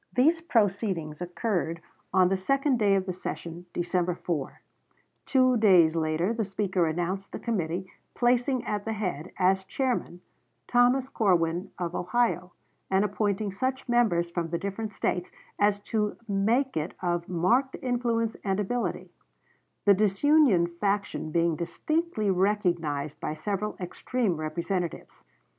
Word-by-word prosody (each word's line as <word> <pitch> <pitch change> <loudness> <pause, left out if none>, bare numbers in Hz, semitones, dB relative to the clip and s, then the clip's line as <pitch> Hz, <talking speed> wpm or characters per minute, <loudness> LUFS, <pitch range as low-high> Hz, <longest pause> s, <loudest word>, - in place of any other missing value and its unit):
These 315 +7 +4
proceedings 195 - 0
occurred 175 -2 -2 0.3
on 185 -1 +4
the 195 - +2
second 275 +6 +1
day 200 -2 +4
of 190 -1 0
the 185 - -3
session, 175 -1 -6
December 175 0 0
4; 160 -7 -4 0.7
two 255 -2 +4
days 180 -7 +5
later 160 +5 0
the 230 -1 -1
Speaker 190 -3 0
announced 175 +4 -2
the - - -5
committee, 185 -5 -2 0.3
placing 245 +1 +2
at 210 -1 -2
the 225 - -2
head, 185 -6 -3
as 190 +1 +3
chairman, 240 -5 -2 0.5
Thomas 245 +2 +3
Corwin, 180 -6 +1
of 175 -1 -3
Ohio, 180 -2 0 0.4
and 190 +2 +3
appointing 205 0 -1
such 260 +7 -2
members 210 -9 +2
from 170 -1 -2
the 170 - -1
different 200 +4 -4
States 180 0 -1 0.3
as 205 0 +3
to 210 -1 -1
make 225 +7 +1
it 155 +2 -2
of 175 -1 -1
marked 235 +10 +2
influence 235 -3 0
and 195 0 0
ability; 235 +4 -2 0.7
the 200 - +7
disunion 215 - +4
faction 195 0 -2
being 165 0 +2
distinctly 265 - -1
recognized 175 -7 0
by 155 - -3
several 205 +6 -3
extreme 190 +3 -1
representatives. 170 +3 -4
195 Hz, 135 wpm, -27 LUFS, 175-230 Hz, 0.7 s, the